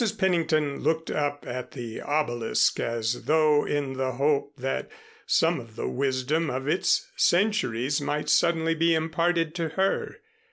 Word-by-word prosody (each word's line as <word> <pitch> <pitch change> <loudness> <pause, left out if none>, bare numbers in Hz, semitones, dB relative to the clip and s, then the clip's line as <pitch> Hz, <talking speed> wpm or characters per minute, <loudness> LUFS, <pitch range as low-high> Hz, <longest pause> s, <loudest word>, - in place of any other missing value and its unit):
Pennington 160 -6 +1
looked 160 +2 -1
up 145 -1 -2
at 125 0 -6
the 120 -4 -6
obelisk 120 -6 0
as 115 0 -2
though 155 -1 +3
in 145 -2 -1
the 130 -1 -2
hope 140 +2 0
that 135 +1 -3 0.4
some 165 -1 +2
of 115 -3 -12
the - - -3
wisdom 140 +4 0
of 130 +2 -4
its 165 +5 +1
centuries 150 - +1
might 150 +1 -2
suddenly 165 -1 +3
be 165 +1 +2
imparted 165 0 0
to 170 -2 -2
her. 190 +5 -1
150 Hz, 145 wpm, -26 LUFS, 130-165 Hz, 0.4 s, though